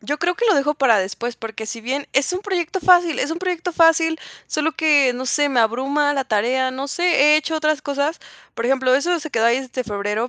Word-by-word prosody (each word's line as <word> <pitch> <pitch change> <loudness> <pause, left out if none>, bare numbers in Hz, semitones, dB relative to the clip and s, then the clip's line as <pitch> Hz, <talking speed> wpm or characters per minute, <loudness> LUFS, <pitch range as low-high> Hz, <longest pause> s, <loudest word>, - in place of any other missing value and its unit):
Yo 290 +2 -4
creo 350 +2 0
que 480 - -2
lo 425 - +4
dejo 295 0 +1
para 255 -7 +3
después, 230 +5 -4
porque 220 -1 -7
si 230 +1 -7
bien 265 +5 -4
es 275 +6 +1
un 365 - -3
proyecto 380 -3 -3
fácil 350 -4 +4
es 290 - -2
un 330 - -3
proyecto 360 -1 -3
fácil, 325 -1 +3 0.3
solo 310 +1 -1
que, 295 -5 +3
no 255 - -5
sé, 290 +2 +1
me 250 -4 +1
abruma 275 +6 +1
la 275 -2 -2
tarea, 255 +3 0
no 270 +2 -6
sé, 345 +5 -3 0.3
he - - +6
hecho 315 +1 -2
otras 310 -1 0
cosas, 285 +2 -2 0.4
por 230 - -3
ejemplo, 260 -1 +2
eso 345 +6 +1
se 310 0 -8
quedó 225 -4 +1
ahí 240 +3 +2
desde 255 -1 -5
febrero, 210 +2 -3
285 Hz, 235 wpm, -20 LUFS, 250-325 Hz, 0.4 s, he